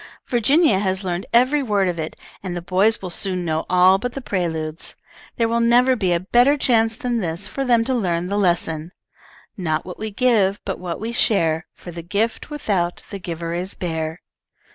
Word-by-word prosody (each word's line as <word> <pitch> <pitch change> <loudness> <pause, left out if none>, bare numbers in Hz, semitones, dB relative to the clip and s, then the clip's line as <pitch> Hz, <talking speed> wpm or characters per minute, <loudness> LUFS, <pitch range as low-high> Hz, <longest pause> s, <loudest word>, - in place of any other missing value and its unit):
Virginia 250 - +3
has 190 -1 -1
learned 180 0 -3
every 255 +5 +4
word 205 -6 +1
of 175 -2 -2
it, 155 0 -4 0.3
and 185 -2 -5
the - - -4
boys 195 +5 +2
will 180 - -4
soon 185 0 -1
know 160 -1 -1
all 185 +1 +5
but 245 +3 -4
the 275 - -4
preludes. 165 - -3 0.4
There 230 - +2
will 230 +1 +1
never 245 +2 +4
be 190 -6 0
a 170 - +2
better 245 +10 +3
chance 225 -4 +2
than 245 -4 -1
this 170 -4 -4
for 275 - -3
them 240 -3 +3
to 260 - 0
learn 175 -7 0
the 200 +3 -2
lesson: 170 -3 0 0.6
"'Not 160 -4 -1
what 180 - -8
we 220 - -3
give, 205 -3 +2
but 195 - -3
what 175 -2 -5
we 225 +2 -4
share, 165 -9 +1
For 175 - -10
the 170 0 -7
gift 205 - -2
without 195 - -2
the 200 - -5
giver 170 -2 -5
is 180 +3 -3
bare.' 160 -1 -4
190 Hz, 195 wpm, -21 LUFS, 175-235 Hz, 0.6 s, all